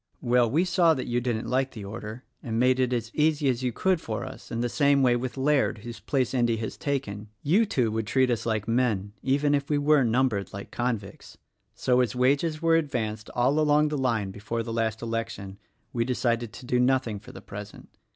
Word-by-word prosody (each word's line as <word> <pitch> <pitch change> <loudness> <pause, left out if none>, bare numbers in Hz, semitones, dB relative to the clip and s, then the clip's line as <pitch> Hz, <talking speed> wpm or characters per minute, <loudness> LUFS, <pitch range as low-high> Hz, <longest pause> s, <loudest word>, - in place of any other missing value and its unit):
"Well, 120 -1 +3
we 160 +9 +2
saw 175 -3 +4
that 130 - -3
you 120 0 0
didn't 120 -2 -2
like 130 +1 0
the 105 -4 -7
order 110 +4 -7 0.2
and 115 -2 -2
made 130 +1 +3
it 125 -1 +2
as 115 -2 -2
easy 150 -2 +2
as 125 -1 0
you 125 -1 0
could 185 +6 +1
for 110 -6 -4
us, - - -10
and 115 +1 -2
the - - +1
same 140 +2 +3
way 125 -1 +4
with 125 +2 -4
Laird 135 -3 +2
whose 120 -1 -7
place 130 -3 -1
Endy 120 -3 +2
has 110 0 -4
taken 110 -8 -3
— 100 - -47
you 215 +5 +5
two 125 - +1
would 110 -1 -2
treat 130 +1 +2
us 115 -1 -1
like 110 -2 -1
men, 115 -4 0
even 145 +2 +2
if 140 -1 0
we 150 - +2
were 145 -1 +4
numbered 115 -4 +1
like 100 0 -8
convicts. 115 -5 -4 0.4
So, 125 0 +2
as 120 -3 -1
wages 145 +5 +1
were 165 0 +5
advanced 110 -8 -2
all 130 +5 +2
along 150 0 +3
the 150 - -2
line 115 -8 0
before 110 +4 -4
the 115 0 -5
last 110 -1 -1
election 115 -4 -4 0.3
we 115 - +1
decided 120 -2 -1
to 125 - -10
do 125 0 +1
nothing 125 -4 +1
for - - -13
the - - -10
present. 105 +1 -9
125 Hz, 220 wpm, -27 LUFS, 115-140 Hz, 0.4 s, you